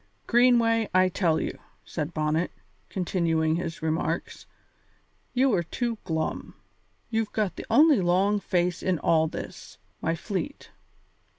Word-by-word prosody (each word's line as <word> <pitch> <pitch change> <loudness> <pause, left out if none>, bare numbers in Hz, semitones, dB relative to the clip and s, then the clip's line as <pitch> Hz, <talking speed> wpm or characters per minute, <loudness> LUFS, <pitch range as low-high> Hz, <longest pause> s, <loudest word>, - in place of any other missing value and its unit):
"Greenway, 230 -2 +4
I 185 0 +5
tell 170 -3 +1
you," - - -4 0.3
said 155 -1 -4
Bonnet, 155 +2 0 0.4
continuing 165 -4 0
his 165 -2 -5
remarks, 160 0 -2 0.9
"you 260 0 +3
are 180 - +3
too 230 +6 -3
glum; 160 -3 -3 0.6
you've 225 -1 0
got 210 -4 -1
the - - -8
only 295 -7 +6
long 190 +4 +2
face 180 -2 0
in 185 -2 +1
all 160 +1 +3
this, - - -8 0.2
my 165 +1 0
fleet. 205 - -5
180 Hz, 125 wpm, -26 LUFS, 165-225 Hz, 0.9 s, only